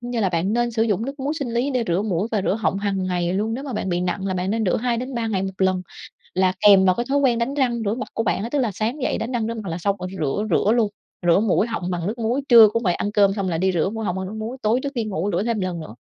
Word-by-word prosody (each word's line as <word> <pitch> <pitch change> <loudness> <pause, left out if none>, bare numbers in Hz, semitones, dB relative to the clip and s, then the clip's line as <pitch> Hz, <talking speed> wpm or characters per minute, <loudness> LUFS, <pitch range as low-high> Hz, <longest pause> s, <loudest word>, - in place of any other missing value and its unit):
cũng 240 0 -6
như 240 -2 -1
là 195 - +2
bạn 175 +3 0
nên 240 +1 +1
sử 225 -1 0
dụng 220 -1 0
nước 275 0 -6
muối 290 +3 -1
sinh 245 -4 -4
lý 255 +4 +1
để 250 -3 0
rửa 175 +2 +1
mũi 205 0 -1
và 210 -4 0
rửa 195 - +1
họng 200 -3 -1
hằng 195 -2 -1
ngày 175 -1 -1
luôn. 215 +4 -1
Nếu 270 +3 -5
mà 270 - -5
bạn 210 - -3
bị 175 -1 0
nặng 180 +2 -2
là 190 - -1
bạn 185 +1 -1
nên 220 +1 0
rửa 180 - +2
2-3 240 0 -2
ngày 195 -3 -1
1 190 - -3
lần, 185 -1 +1 0.5
là 185 0 +2
kèm 195 -2 +7
vào 185 -1 +4
cái 240 - -2
thói 285 - +2
quen 255 -4 +3
đánh 235 +4 -1
răng 245 -5 0
rửa 205 - +1
mặt 255 - -5
của 225 - -1
bạn 200 - 0
á. 230 - -4
Tức 285 +2 0
là 235 -5 +1
sáng 235 +8 -2
dậy - - 0
đánh 230 +3 -4
răng 230 -3 -1
rửa 230 - -2
mặt 215 -5 -6
là 165 - -3
xong 195 +3 0
rồi 180 - -4
thì 190 - -8
rửa 155 +7 -1
rửa 200 +4 +2
luôn, 230 -3 +2 0.4
rửa 170 +2 +5
mũi 215 +1 +2
họng 200 -6 -3
bằng 175 -1 -2
nước 220 +4 -3
muối, 235 +4 0
trưa 230 -3 +9
cũng 230 +3 -2
vậy, 180 -4 +2
ăn 205 - -2
cơm 200 -2 +4
xong 195 -2 -2
là 165 - -1
đi 190 +3 +1
rửa 175 0 +1
mũi 225 +1 -4
họng 180 - -1
bằng 190 - -3
nước 205 - -7
muối, 230 +4 -5
tối 225 +4 +2
trước 280 0 -3
đi 235 -4 -1
ngủ 200 -2 -2
rửa - - +1
thêm 230 -2 -1
lần 180 -2 -3
nữa. 155 -8 -9
215 Hz, 330 wpm, -22 LUFS, 190-235 Hz, 0.5 s, trưa